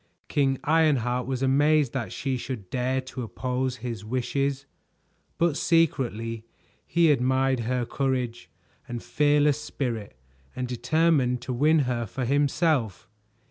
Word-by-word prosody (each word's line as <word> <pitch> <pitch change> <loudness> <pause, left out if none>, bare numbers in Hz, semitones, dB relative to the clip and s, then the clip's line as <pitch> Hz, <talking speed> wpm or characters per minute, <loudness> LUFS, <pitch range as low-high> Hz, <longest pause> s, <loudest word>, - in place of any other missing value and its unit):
King 135 -2 +2
Ironheart 135 -6 +2
was 135 0 -2
amazed 145 0 +3
that 130 -4 -3
she 135 -2 -2
should 120 -7 -6
dare 130 +1 0
to 130 0 -7
oppose 125 +4 -2
his 115 -4 -4
wishes, 135 +4 -1 0.7
but 170 -3 +2
secretly 120 - 0 0.4
he 170 -2 +4
admired 130 0 +2
her 120 +1 -1
courage 125 -3 -2 0.4
and 120 -1 -5
fearless 150 0 +2
spirit 115 - -4 0.4
and 125 0 -3
determined 125 +1 +2
to 130 - -3
win 150 +5 +3
her 120 -2 -2
for 130 +5 -4
himself. 140 - +1
130 Hz, 125 wpm, -26 LUFS, 120-145 Hz, 0.7 s, he